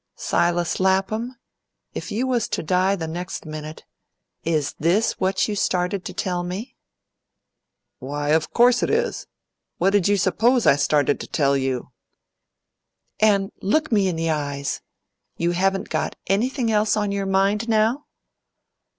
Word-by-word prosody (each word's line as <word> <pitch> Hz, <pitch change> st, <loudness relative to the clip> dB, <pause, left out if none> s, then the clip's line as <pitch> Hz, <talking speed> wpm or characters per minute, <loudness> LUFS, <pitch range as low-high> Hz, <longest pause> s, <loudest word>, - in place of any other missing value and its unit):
"Silas 175 Hz, 0 st, 0 dB
Lapham, 195 Hz, +6 st, 0 dB, 0.6 s
if -, -, -6 dB
you 235 Hz, +5 st, -1 dB
was 245 Hz, -4 st, 0 dB
to -, -, -3 dB
die 185 Hz, +4 st, +2 dB
the 165 Hz, -4 st, -4 dB
next 175 Hz, +2 st, -5 dB
minute, 155 Hz, 0 st, -8 dB, 0.6 s
is 155 Hz, -3 st, 0 dB
this 180 Hz, +8 st, +1 dB
what 190 Hz, 0 st, +1 dB
you 210 Hz, -, -2 dB
started 180 Hz, 0 st, 0 dB
to -, -, -4 dB
tell 180 Hz, -1 st, -2 dB
me?" 185 Hz, +7 st, -6 dB, 1.2 s
"Why, 145 Hz, +2 st, -4 dB
of 155 Hz, 0 st, +2 dB
course 245 Hz, +1 st, +4 dB
it -, -, 0 dB
is. 470 Hz, +2 st, -1 dB, 0.5 s
What 190 Hz, +3 st, +2 dB
did 200 Hz, -3 st, +3 dB
you 205 Hz, 0 st, +3 dB
suppose 230 Hz, +7 st, +2 dB
I -, -, +6 dB
started 145 Hz, 0 st, +1 dB
to -, -, -7 dB
tell 140 Hz, -3 st, +1 dB
you?" 130 Hz, -2 st, -2 dB, 1.3 s
"And 200 Hz, -2 st, +3 dB
look 310 Hz, +11 st, +1 dB
me 205 Hz, -4 st, +3 dB
in 180 Hz, -, -1 dB
the 165 Hz, 0 st, 0 dB
eyes! 140 Hz, -2 st, -3 dB, 0.6 s
you 170 Hz, +1 st, +1 dB
haven't 195 Hz, +2 st, 0 dB
got 155 Hz, -1 st, -2 dB
anything 235 Hz, +4 st, 0 dB
else 215 Hz, 0 st, +2 dB
on 205 Hz, -1 st, 0 dB
your 200 Hz, -1 st, -2 dB
mind 200 Hz, +4 st, +1 dB
now?" 225 Hz, +6 st, +2 dB
190 Hz, 150 wpm, -23 LUFS, 160-215 Hz, 1.3 s, I